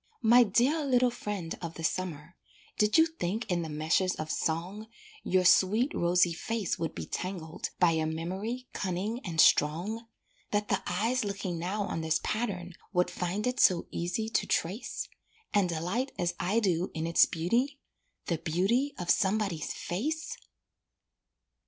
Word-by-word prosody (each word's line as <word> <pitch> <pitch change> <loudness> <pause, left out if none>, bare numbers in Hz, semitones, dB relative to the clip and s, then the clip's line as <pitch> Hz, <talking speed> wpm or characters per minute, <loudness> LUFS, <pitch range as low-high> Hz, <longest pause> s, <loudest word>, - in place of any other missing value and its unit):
My 235 +2 +7
dear 245 - +3
little 250 -3 +3
friend 205 -8 -4
of 170 -1 -5
the 165 - -7
summer, 170 -1 -3 0.4
Did 210 +5 +4
you 320 - +7
think 230 - -3
in 175 -1 +1
the 160 - -5
meshes 160 +5 +1
of 155 0 -4
song 180 +7 -2 0.4
Your 185 0 +2
sweet, 215 +9 +4
rosy 175 0 +3
face 220 +3 -2
would 165 -2 -3
be 80 - -5
tangled 175 - -4
By 175 -2 +5
a 160 -1 0
memory 190 +10 -4
cunning 195 +5 -2
and 165 -3 -4
strong? 185 +12 +3 0.4
That 205 0 -1
the - - +1
eyes 235 +4 0
looking 195 -4 -3
now 195 +5 -2
on 165 - -3
this 160 -1 +1
pattern 190 -6 -2 0.2
Would 180 -1 +2
find 180 +4 -2
it 250 0 -1
so 180 -2 +5
easy 175 +6 -2
to - - 0
trace? 190 +8 -2 0.5
And 200 -3 +3
delight 180 - -2
as 175 0 0
I 185 +7 +1
do 180 -4 +1
in 160 0 -2
its 170 0 +5
beauty 240 - 0 0.5
The 170 -3 -1
beauty 195 - +1
of 175 -1 +1
somebody's 195 -5 0
face? 300 - -3
185 Hz, 155 wpm, -30 LUFS, 170-220 Hz, 0.5 s, My